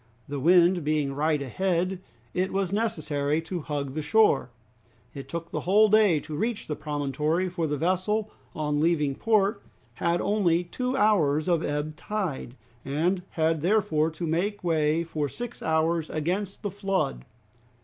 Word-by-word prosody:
The 145 0 -4
wind 175 +3 +5
being 150 -2 0
right 150 +2 +1
ahead 180 +6 -1 0.3
it 185 +1 0
was 195 -1 -1
necessary 155 -9 0
to 180 +1 -4
hug 145 -2 -3
the 155 - -2
shore. 210 - +3 0.6
It 135 -1 -8
took 170 +1 -5
the - - -2
whole 210 +4 +4
day 210 -6 +5
to 155 -1 -7
reach 220 +6 -2
the 150 - -3
promontory, 150 +4 -1
for 170 -2 -2
the 150 0 -1
vessel 185 +6 0 0.2
on 150 -1 -1
leaving 150 -3 +2
port 210 +4 +1 0.3
had 170 +8 0
only 180 -5 +2
two 250 +9 -3
hours 155 - +3
of 170 -2 +2
ebb 150 +1 -3
tide 185 - -4 0.3
and 170 +7 0
had 160 -1 0
therefore 175 -4 +2
to 165 +2 -5
make 180 +6 -1
way 160 -1 +2
for 155 -3 -3
six 240 - -7
hours 160 0 +1
against 180 +6 -2
the 205 - -2
flood. 195 - -1
165 Hz, 155 wpm, -27 LUFS, 150-195 Hz, 0.6 s, wind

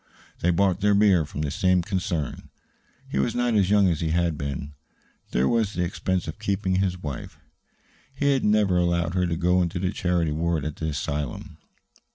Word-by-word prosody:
They 90 - +1
bought 95 +1 +2
their 105 0 +4
beer 100 -6 +4
from 75 0 -6
the 70 - -2
same 90 +2 +2
concern. 90 - -3 0.6
He 70 - -2
was 70 - 0
not 120 -1 +1
as 100 -3 +3
young 100 -1 +5
as 85 -3 0
he 80 - 0
had 85 0 +1
been; 70 0 -5 0.6
there 65 +2 +1
was 110 -3 +1
the 90 - -1
expense 90 0 -2
of 80 - -6
keeping 95 -2 0
his 95 -1 0
wife 75 -7 -7 0.8
he 140 +1 +2
had 135 - 0
never 105 -3 +3
allowed 85 -1 +1
her 90 -1 +1
to 85 -1 -2
go 90 +1 +2
into 85 +1 -1
the 90 +1 -1
charity 90 -5 0
ward 80 0 -1
at 75 -1 -4
the 80 - -3
asylum. 70 -2 -4
90 Hz, 195 wpm, -25 LUFS, 80-95 Hz, 0.8 s, young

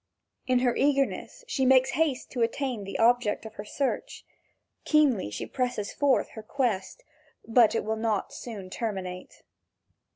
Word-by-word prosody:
In 255 -1 +3
her 245 - +2
eagerness 275 - 0
she 295 - -1
makes 260 0 +5
haste 285 -3 0
to 250 - -3
attain 235 -2 -1
the 195 - -4
object 230 -2 +2
of 220 - -8
her 205 - -7
search. 280 - -3 0.6
Keenly 285 - +3
she 105 - -5
presses 245 -5 -2
forward 285 -2 +3
in - - -12
her 220 - -7
quest, 235 - -2 0.4
but 230 -1 +5
it 225 - -1
will 220 +1 -1
not 220 -3 -1
soon 200 -6 -8
terminate. 185 -5 -5
240 Hz, 155 wpm, -27 LUFS, 210-265 Hz, 0.6 s, makes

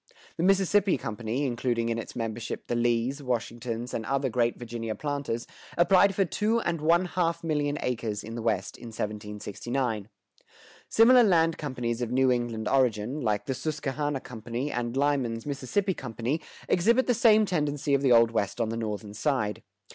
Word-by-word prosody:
The - - -3
Mississippi 195 +1 +3
Company, 115 +5 -3
including 120 -2 -1
in 115 0 -1
its - - -8
membership 115 0 -4
the - - -3
Lees, 120 +4 +1
Washingtons, 120 -1 -3
and 110 - -2
other 135 0 0
great 120 0 +1
Virginia 115 -2 -5
planters, 140 -5 -3 0.3
applied 185 +3 +5
for 195 - +3
two 215 +6 +1
and 170 -6 -2
one 170 +4 +3
half 170 -1 -1
million 150 -2 0
acres 110 -4 -2
in 110 - -7
the 115 - -4
West 105 -4 -1
in 120 - -10
1769. 105 +1 -4 0.8
Similar 245 +3 +7
land 165 -7 +3
companies 125 -5 -3
of 120 - -1
New 130 0 +3
England 120 -3 -1
origin, 125 +1 +1
like 105 -4 0
the 135 - -1
Susquehanna 145 -1 -2
Company 120 +4 -5
and 120 +1 -2
Lyman's 135 -5 0
Mississippi 145 +8 -1
Company, 125 +3 -3 0.3
exhibit 235 +8 +3
the 250 - +3
same 220 -2 +5
tendency 150 -5 -1
of 140 - +3
the 135 -2 +3
Old 115 -1 +6
West 105 -1 -1
on 115 -2 0
the 115 - -3
northern 105 -2 -4
side. 110 -3 -1
125 Hz, 165 wpm, -27 LUFS, 115-155 Hz, 0.8 s, Similar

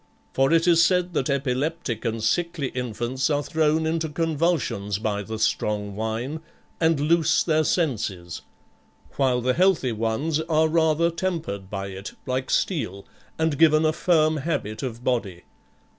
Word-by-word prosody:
For 135 +1 +2
it 165 +1 +3
is 170 -1 +6
said 180 0 +2
that 135 - 0
epileptic 140 -1 -1
and 115 -1 -2
sickly 165 +3 0
infants 125 +2 -2
are 145 -1 +1
thrown 160 +1 +1
into 160 0 -1
convulsions 155 - -1
by 105 -1 -2
the 110 +2 -6
strong 105 -2 -1
wine 110 +8 -3 0.4
and 160 -3 +2
loose 160 +2 +3
their 155 -2 +2
senses, 105 - -2 0.8
while 130 -3 +2
the 130 +1 +1
healthy 180 -7 +2
ones 115 +8 -1
are 160 0 +2
rather 160 +1 +2
tempered 165 - -3
by 100 -1 -4
it, 95 +1 -8
like 130 +1 -2
steel, 110 - -1 0.3
and 160 -3 0
given 155 -1 +5
a 155 - +2
firm 155 -3 +2
habit 135 -8 -3
of 125 -3 -5
body. 105 -9 -2
145 Hz, 145 wpm, -24 LUFS, 110-160 Hz, 0.8 s, is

